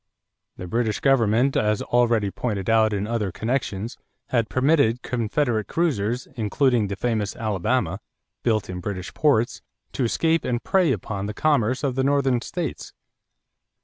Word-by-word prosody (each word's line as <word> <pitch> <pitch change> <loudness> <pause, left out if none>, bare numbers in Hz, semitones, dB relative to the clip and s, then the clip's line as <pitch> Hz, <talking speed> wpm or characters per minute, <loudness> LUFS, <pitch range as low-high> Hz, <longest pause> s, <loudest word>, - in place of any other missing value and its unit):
The 90 - -6
British 110 +3 -1
government, 130 -2 +3
as 105 0 +1
already 115 -4 +2
pointed 105 -3 -2
out 110 -1 +4
in 100 -1 -1
other 110 -3 -2
connections, 115 -1 -3 0.3
had 115 -3 +1
permitted 130 -3 +2
Confederate 120 -1 -1
cruisers, 125 -8 -1
including 120 0 +1
the 100 - -4
famous 110 -1 -1
Alabama, 110 -1 -1 0.4
built 110 -3 +1
in 90 -1 -5
British 95 0 -5
ports, 135 -7 +1 0.3
to 135 - -2
escape 160 +7 +1
and 120 -1 -2
prey 185 -6 +3
upon 100 -5 -3
the 105 - -5
commerce 130 -3 +1
of 135 -3 0
the 130 +1 0
Northern 135 -3 +2
states. 165 +2 -5
115 Hz, 145 wpm, -24 LUFS, 105-130 Hz, 0.4 s, out